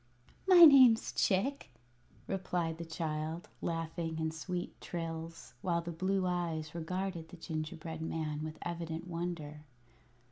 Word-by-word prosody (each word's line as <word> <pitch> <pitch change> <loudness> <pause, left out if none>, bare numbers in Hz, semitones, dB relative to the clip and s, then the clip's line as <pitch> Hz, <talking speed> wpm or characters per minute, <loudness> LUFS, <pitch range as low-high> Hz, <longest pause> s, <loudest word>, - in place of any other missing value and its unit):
"My 355 -3 +11
name's 260 -6 +7
Chick," 235 - +1 0.6
replied 175 -4 -2
the 170 - -4
child, 160 0 -3
laughing 165 0 -3
in 160 0 -1
sweet 175 +3 -5
trills, 165 -1 -6
while 170 -2 +1
the 170 +1 -5
blue 185 +3 0
eyes 165 -4 -2
regarded 170 0 -3
the 180 - -11
gingerbread 160 0 -5
man 155 -2 -3
with 155 0 -5
evident 170 0 -4
wonder. 165 -4 -4
165 Hz, 120 wpm, -33 LUFS, 160-180 Hz, 0.6 s, My